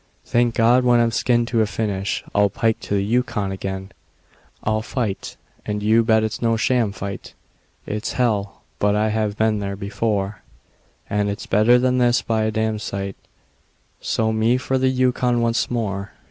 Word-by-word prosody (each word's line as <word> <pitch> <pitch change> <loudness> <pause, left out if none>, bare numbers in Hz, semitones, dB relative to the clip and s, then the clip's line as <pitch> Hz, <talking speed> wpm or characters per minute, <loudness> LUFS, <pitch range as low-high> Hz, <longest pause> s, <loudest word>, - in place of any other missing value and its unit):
Thank 120 -1 +1
God! 120 +3 +4
when 120 -1 +4
I'm 115 0 +2
skinned 120 +1 +1
to 115 -2 +2
a 110 - +2
finish 100 -3 -2
I'll 100 0 +3
pike 110 +3 0
to 100 - -3
the 100 - +1
Yukon 105 -3 0
again. 95 0 -5 0.7
I'll 110 0 0
fight 110 -3 -4 0.3
and 105 0 -3
you 110 +2 +4
bet 110 -1 +3
it's 110 0 -3
no 115 -1 +2
sham 120 -2 +1
fight; 100 0 -7 0.5
It's 105 +1 -3
hell! 105 -5 -1 0.2
but 105 0 +2
I've 105 0 0
been 110 -1 +2
there 100 -1 -3
before; 100 0 -2 0.7
And 105 0 0
it's 100 - -5
better 110 +5 +4
than 125 0 +2
this 120 0 +3
by 110 -1 0
a 110 - 0
damsite 105 -3 -2 0.8
So 110 0 0
me 110 +3 +2
for 130 +1 -1
the 130 0 +3
Yukon 125 -1 +1
once 115 0 +1
more. 100 -4 -3
110 Hz, 165 wpm, -21 LUFS, 100-120 Hz, 0.8 s, God